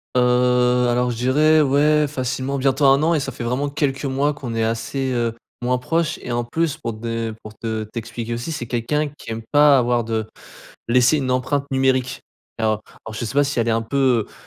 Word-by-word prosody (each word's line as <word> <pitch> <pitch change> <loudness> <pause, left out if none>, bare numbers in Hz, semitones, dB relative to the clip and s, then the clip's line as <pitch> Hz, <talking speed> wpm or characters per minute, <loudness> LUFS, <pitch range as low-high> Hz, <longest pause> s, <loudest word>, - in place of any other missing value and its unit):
Heu, 125 0 +3
alors 125 +1 +1
je 115 - -5
dirais 150 +5 +4
ouais 150 +2 +3
facilement 130 0 -3
bientôt 135 +2 +1
1 135 +2 +5
an 165 +1 +3
et 155 - +2
ça 135 0 -4
fait 120 - -7
vraiment 130 +4 -1
quelques 140 -1 -1
mois 140 +2 0
qu'on 125 -5 -6
est 115 - 0
assez, 130 +4 -2
heu, 120 -2 0 0.3
moins 125 +1 +1
proches 160 +4 -1
et 125 - -5
en 120 0 0
plus 160 +5 -1
pour 115 - -4
te 110 - -11
de, - - -2 0.2
heu, - - -10
pour 110 0 -10
te 110 -1 -3
t'expliquer 115 +1 -6
aussi, 120 +7 -4
c'est 120 -6 -5
quelqu'un 145 +6 -1
qui - - -9
aime 115 0 -4
pas 145 -1 +6
avoir 120 -1 +1
de 110 -1 -2 0.6
laisser 125 +5 +4
une 130 -2 -2
empreinte 135 +3 0
numérique. 130 -1 0 0.4
Alors 110 -1 0 0.2
alors 110 - -8
je 110 - -4
sais 120 - -5
pas 145 0 +4
si 140 -2 -2
elle 115 0 +1
est - - +3
un 115 0 +1
peu, 125 -2 +1
heu, - - -21
125 Hz, 225 wpm, -21 LUFS, 115-140 Hz, 0.6 s, pas